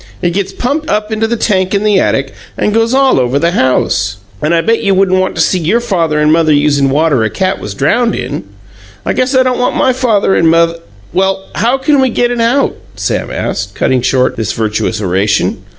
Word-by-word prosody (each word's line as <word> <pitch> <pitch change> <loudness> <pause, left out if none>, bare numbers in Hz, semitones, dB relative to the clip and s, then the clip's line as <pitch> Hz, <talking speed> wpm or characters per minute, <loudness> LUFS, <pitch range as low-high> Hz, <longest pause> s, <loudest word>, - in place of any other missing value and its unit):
It 175 - +1
gets 195 +1 -2
pumped 285 +9 -3
up 210 +1 -1
into 220 +1 0
the 235 +1 -2
tank 190 -3 0
in 200 - 0
the 210 -2 +3
attic 135 0 -1 0.2
and 210 - 0
goes 225 +1 +1
all 270 - +3
over 125 +2 0
the 170 +3 +1
house, 115 - 0 0.2
and 150 - 0
I 170 -1 +3
bet 230 +5 +1
you 195 -1 +1
wouldn't 185 -1 +2
want 185 - -1
to - - 0
see 185 - +1
your 175 +8 +1
father 175 -10 -1
and 150 +1 +3
mother 160 -1 +2
usin' 145 -1 +2
water 145 -3 +1
a 110 - 0
cat 185 - -2
was 105 -1 -6
drowned 230 - +1
in. 125 -4 -5 0.6
I - - 0
guess 255 +1 0
I 260 - +5
don't 255 -1 -1
want 250 - 0
my 260 - +2
father 225 -6 +1
and 165 - +3
moth 165 0 +2 0.2
" 100 0 -26
"Well, 190 0 0
how 230 +11 +1
CAN 275 +1 +2
we 260 - +2
get 240 +1 0
it 240 -1 -1
out?" 245 +5 +1 0.2
Sam - - -2
asked, - - -4
cutting 130 -1 +1
short 130 +1 +1
this 110 -2 -2
virtuous 110 0 -2
oration. 100 +1 0
185 Hz, 225 wpm, -12 LUFS, 140-230 Hz, 0.6 s, I